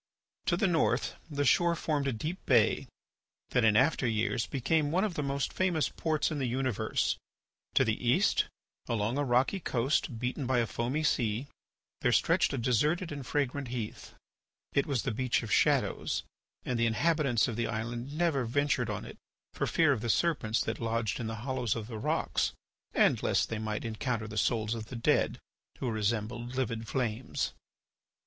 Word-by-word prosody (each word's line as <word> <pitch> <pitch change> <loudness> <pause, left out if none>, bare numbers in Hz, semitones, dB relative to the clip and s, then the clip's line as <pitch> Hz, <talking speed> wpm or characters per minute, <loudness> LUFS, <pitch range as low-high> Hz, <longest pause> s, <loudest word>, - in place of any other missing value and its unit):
To 175 - +3
the 210 - +2
north 170 -4 +1
the 145 -1 -1
shore 170 +5 +4
formed 150 -4 -1
a - - +2
deep 155 - -4
bay - - +3 0.6
that 125 - +3
in 110 -1 +5
after 135 0 +3
years 115 +1 0
became 145 +3 +1
one 180 +5 +2
of 210 -4 0
the 150 - -2
most 140 -1 -1
famous 170 -6 +1
ports 155 -1 0
in 150 - -2
the 130 - 0
universe. 130 -2 0 0.6
To - - +5
the - - -1
east, - - +3 0.4
along 115 +4 0
a - - +2
rocky 130 +8 +2
coast 130 -3 0
beaten 125 +2 -2
by 130 0 +2
a 120 - +3
foaming 125 +7 -2
sea, 115 -4 +1 0.5
there - - +2
stretched - - +3
a - - -2
deserted 150 - +1
and 140 -2 -5
fragrant 140 0 -1
heath. 120 -3 -6 0.6
It 140 - +2
was 135 -7 0
the 135 - -1
Beach 125 +1 0
of 110 - -6
Shadows, - - +2 0.4
and 125 -2 -1
the 115 - +3
inhabitants 140 -1 +2
of 120 - -3
the 115 0 -1
island 120 +6 -4
never 160 -7 +2
ventured 145 +5 +1
on - - -3
it - - -10 0.4
for - - -1
fear 160 -3 +4
of 125 -6 0
the 115 - -2
serpents 120 -6 +1
that 110 0 -2
lodged 115 0 -1
in 115 - -3
the 110 - -3
hollows 130 -5 0
of 110 - -4
the 110 -1 -6
rocks - - 0 0.4
and - - +4
lest - - +1
they 110 - -3
might 110 +1 -3
encounter 115 0 -2
the 110 - -8
souls 110 -2 +1
of 110 -1 -5
the 125 - -7
dead 115 - +2 0.4
who 125 - -2
resembled 115 +3 -2
livid 115 -3 -2
flames. 120 -2 -2
125 Hz, 180 wpm, -30 LUFS, 115-145 Hz, 0.6 s, in